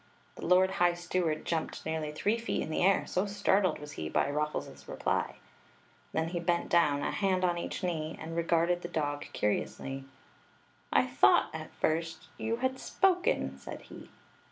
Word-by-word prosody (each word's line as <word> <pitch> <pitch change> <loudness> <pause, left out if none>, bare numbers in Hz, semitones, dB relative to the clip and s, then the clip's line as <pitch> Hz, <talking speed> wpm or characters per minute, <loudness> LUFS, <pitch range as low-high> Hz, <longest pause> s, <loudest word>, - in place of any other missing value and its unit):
The - - -6
lord 185 +2 +5
high 175 -2 +3
steward 175 -2 -1
jumped 165 -2 -2
nearly 160 -1 -2
three 210 +9 0
feet 230 - -1
in 160 - -5
the - - 0
air, 195 +2 +4
so 185 +3 0
starded 195 -3 +2
was 150 0 -9
he 80 - -5
by 140 - +1
Ruffles's 150 +1 -3
reply. - - -1 0.8
Then 160 +1 0
he 175 0 -2
bent 170 0 0
down, 150 -4 +3
a - - 0
hand 190 -2 +1
on 175 -1 +1
each - - -5
knee, 160 -3 -2
and 165 +1 -6
regarded 170 +1 +2
the 175 - -4
dog 145 -3 -2
curiously. 135 +5 -2 0.9
"I - - +4
thought, - - +4
at - - -6
first, 165 +1 -1
you 225 +1 0
had 260 +1 -1
spoken!" 380 +5 +1
said - - -7
he. - - -11
170 Hz, 170 wpm, -31 LUFS, 155-185 Hz, 0.9 s, lord